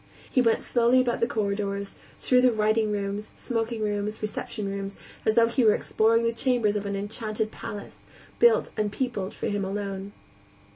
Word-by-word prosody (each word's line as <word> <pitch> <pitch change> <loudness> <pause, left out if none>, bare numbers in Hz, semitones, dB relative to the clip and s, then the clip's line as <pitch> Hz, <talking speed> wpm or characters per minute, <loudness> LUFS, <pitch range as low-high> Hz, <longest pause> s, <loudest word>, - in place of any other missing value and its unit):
He 255 - +4
went 230 -2 +2
slowly 240 +1 +3
about 245 -2 +1
the 230 - +2
corridors, 200 -2 -2 0.2
through 250 -1 +3
the 250 -1 +5
writing 215 0 +2
rooms, 205 +1 -3
smoking 230 -2 -2
rooms, 210 0 -2
reception 210 0 -4
rooms, 195 0 -4 0.3
as 220 - +3
though 230 -1 +6
he 235 +2 +1
were 215 -2 +6
exploring 225 +1 +2
the 230 0 +1
chambers 230 -3 +1
of 205 -1 -2
an 200 - -2
enchanted 215 +2 -3
palace, 210 -3 -8 0.4
built 475 -1 +4
and 210 -1 -1
peopled 210 -5 -3
for - - -5
him 205 -1 -1
alone. 195 0 -4
215 Hz, 175 wpm, -26 LUFS, 200-230 Hz, 0.4 s, though